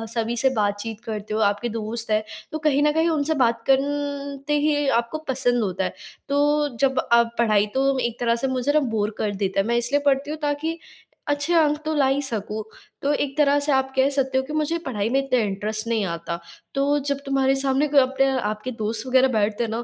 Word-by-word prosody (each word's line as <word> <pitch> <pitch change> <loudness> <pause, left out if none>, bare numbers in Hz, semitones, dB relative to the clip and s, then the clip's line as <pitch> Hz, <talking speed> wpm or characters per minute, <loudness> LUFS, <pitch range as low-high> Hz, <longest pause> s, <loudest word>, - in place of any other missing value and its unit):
सभी 230 0 -1
से 265 +3 +3
बातचीत 210 +1 -1
करते 215 -1 -5
हो, 215 - 0
आपके 205 +2 +1
दोस्त 225 0 -4
हैं, 215 0 +2 0.3
तो 310 - -2
कहीं 295 -2 +2
न 300 - +4
कहीं 320 +2 +2
उनसे 315 -1 +1
बात 230 0 -1
कन 280 0 0
ते 295 0 +2
ही 290 -1 +1
आपको 235 +6 -6
पसंद 245 -2 +1
होता 190 -1 -2
है। - - 0 0.4
तो 280 - +1 0.4
जब 265 -1 +2
आप 235 0 +4
पढ़ाई 215 -3 +3
तो 270 0 +2
एक 240 -1 -2
तरह 235 -1 +2
से 235 +3 -2
मुझे 260 +1 0
ना 305 - +5
बोर 225 -7 -1
कर 210 - -1
देता 195 0 -1
है। 195 - +2
मैं 235 - +1
इसलिए 245 +4 +1
पढ़ती 280 +1 +2
हूँ 310 - -4
ताकि 295 +3 -1 0.5
अच्छे 290 +3 0
अंक 305 -3 +4
तो 315 - 0
ला 285 -2 +3
ही 270 +1 +1
सकूँ। 220 -5 -3 0.4
तो 285 - +1
एक 280 -1 -2
तरह 290 -1 +4
से 290 +1 0
आप 265 0 +1
कह 265 +1 +4
सकते 265 -1 0
हो 265 - +2
कि 290 +3 -7
मुझे 310 +2 0
पढ़ाई 215 -5 -1
में 265 +3 +2
इतना 255 -2 +1
इंटरेस्ट 215 +1 -2
नहीं 225 -3 0
आता। 170 -1 -4 0.4
तो 280 +1 +2
जब 280 -1 -1
तुम्हारे 270 -1 +2
सामने 270 +2 +1
कोई 290 -1 +5
अपने 265 +1 +1 0.2
आपके 215 +4 -4
दोस्त 220 +1 -3
वग़ैरह 260 +1 +4
बैठते 215 +1 +1
हैं 225 - -3
ना। 230 +2 -3
265 Hz, 225 wpm, -23 LUFS, 220-285 Hz, 0.5 s, ना